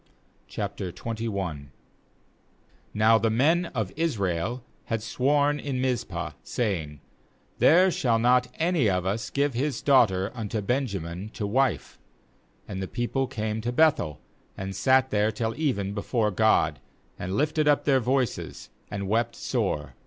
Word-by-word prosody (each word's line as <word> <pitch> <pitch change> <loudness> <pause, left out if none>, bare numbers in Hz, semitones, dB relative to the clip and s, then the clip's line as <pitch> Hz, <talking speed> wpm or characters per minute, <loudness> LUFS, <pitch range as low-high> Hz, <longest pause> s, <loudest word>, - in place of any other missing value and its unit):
322 - - -4
JUDGES - - -16
21.22 115 -1 -3
0 - - -2
1 75 -8 -4 1.2
Now 110 +1 +5
the 115 - +1
men 155 +10 +3
of 110 - -3
Israel 115 - -1 0.2
had 115 -2 -2
sworn 145 +5 +2
^^ - - -10
in 135 -3 -2
Mizpah, 125 -2 -2
saying: 80 - -3 0.6
'There 180 +4 +6
shall 120 -8 +1
not 125 +2 +3
any 165 - +2
of 90 -1 0
us 100 +4 -2
give 140 0 0
his 135 +1 -1
daughter 105 -9 +3
unto 110 -2 -3
Benjamin 100 - -2
to 105 - -3
wife/ 130 +5 0 0.7
2And 95 -2 -5
the 95 - -3
people 120 +5 -1
came 110 -3 -3
to 120 +2 -2
Beth 155 +3 +4
el, 75 -1 -5 0.4
and 95 0 -5
sat 130 +4 +3
there 105 +1 +2
till 110 0 -2
^ - - -14
even 100 -11 -1
before 105 +1 0
God, 110 +3 +2 0.4
and 95 +2 -3
lifted 155 +1 +1
up 145 -1 +3
taeir 135 -2 +4
voices, 130 0 -2 0.2
and 100 -1 -4
wept 115 +3 0
sore. - - -2
115 Hz, 155 wpm, -26 LUFS, 100-135 Hz, 1.2 s, There